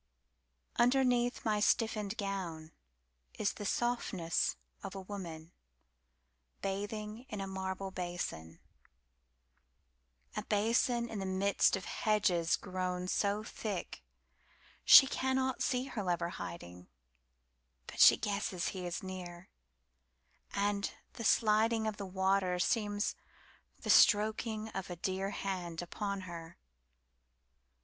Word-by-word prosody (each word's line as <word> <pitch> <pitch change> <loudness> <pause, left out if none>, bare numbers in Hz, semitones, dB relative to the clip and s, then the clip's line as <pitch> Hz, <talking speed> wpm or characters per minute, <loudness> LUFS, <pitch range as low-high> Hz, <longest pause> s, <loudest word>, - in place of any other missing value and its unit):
Underneath 245 -1 +2
my 215 -1 +2
stiffened 215 -1 +1
gownIs 175 -6 -4 0.8
the 205 - -7
softness 225 -9 0 0.3
of 195 -1 -7
a 195 - -5
woman 175 -5 -7 1.1
bathing 210 +4 -4
in 210 - -5
a 195 - -2
marble 190 0 -4
basin,A 65 - -10
basin 235 +3 +2
in 220 -3 -5
the 195 - -3
midst 190 +2 +2
of 190 - -6
hedges 185 -6 +1
grownSo 185 +3 -1
thick, 200 - -5 0.8
she - - +10
cannot 265 0 0
see 250 -1 +1
her 240 -5 -4
lover 175 -2 -1
hiding, 90 - -8 1.0
But - - -9
she - - +9
guesses 200 -3 -2
he 185 -2 -5
is 175 - -4
near, 180 -1 -7 1.0
And 200 0 0 0.2
the 235 - -7
sliding 220 +1 +3
of 215 -1 -2
the 200 - -5
waterSeems 195 +2 +1 0.7
the - - +1
stroking 215 +1 +4
of 190 -3 -5
a 175 - -6
dearHand 190 -2 -3
upon 200 +2 -4
her. 170 -2 -9
195 Hz, 100 wpm, -33 LUFS, 175-215 Hz, 1.1 s, she